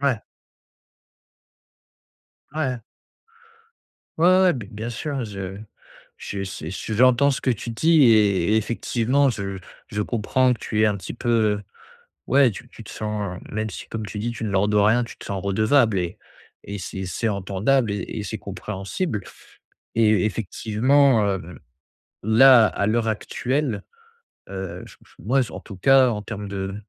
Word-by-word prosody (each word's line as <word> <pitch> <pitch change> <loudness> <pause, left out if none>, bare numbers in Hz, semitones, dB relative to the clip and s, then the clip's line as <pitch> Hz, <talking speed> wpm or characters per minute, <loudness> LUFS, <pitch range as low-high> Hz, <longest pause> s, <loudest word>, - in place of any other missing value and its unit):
Ouais. 135 -6 +1 2.3
Ouais. 135 -6 -2 1.4
Ouais, 170 - +4
ouais, 185 +1 +5
ouais, 185 -1 +5
b 120 -8 -5
bien 110 +3 -5
sûr, 135 +1 -3
je 95 -2 -6 0.6
je 100 -1 -5
su 90 -4 -6
j 110 +3 -5
j'entends 130 +4 +4
ce 135 - -3
que 130 - 0
tu 120 0 -3
dis 155 +6 +4
et 105 -4 +4
effectivement 120 +5 +1
je 100 -5 -3 0.3
je 105 0 -2
comprends 125 +4 +1
que 115 - -14
tu 110 - -2
aies - - +5
un 105 -1 +1
petit 95 - -7
peu, 120 0 -5 0.3
heu 105 - -10 0.6
ouais, 135 -2 +5
tu 115 +4 -10
tu 115 - -13
te - - -10
sens, 105 -4 -4
heu - - -15
même 110 0 -2
si - - -9
comme 110 -1 -5
tu 105 +1 -6
dis 120 +3 -2
tu 115 - -6
ne 105 - -2
leur 100 +1 +2
dois 105 0 +4
rien, 120 +3 +3
tu 115 - -11
te - - -12
sens 100 -3 -4
redevable 110 +2 +2
et 90 +3 -3 0.5
et 100 0 -6
c'est 95 0 -5
c'est 115 +5 -2
entendable 100 +5 0
et 100 -2 -3
et - - -4
c'est - - -4
compréhensible. 105 - -4 0.7
Et 110 -4 +4
effectivement, 115 +4 +2
heu, 90 -3 -4 0.7
là, 115 +1 +7
à 100 - -2
l'heure 115 +1 +1
actuelle, 125 +3 -2 0.7
heu, 95 -2 -6
j - - -14
j - - -23
moi 135 +5 +1
en - - -7
tout 100 - -11
cas, 135 +6 +5
en 105 -2 -3
termes 105 -1 -6
de 95 0 -4
110 Hz, 165 wpm, -23 LUFS, 100-125 Hz, 2.3 s, là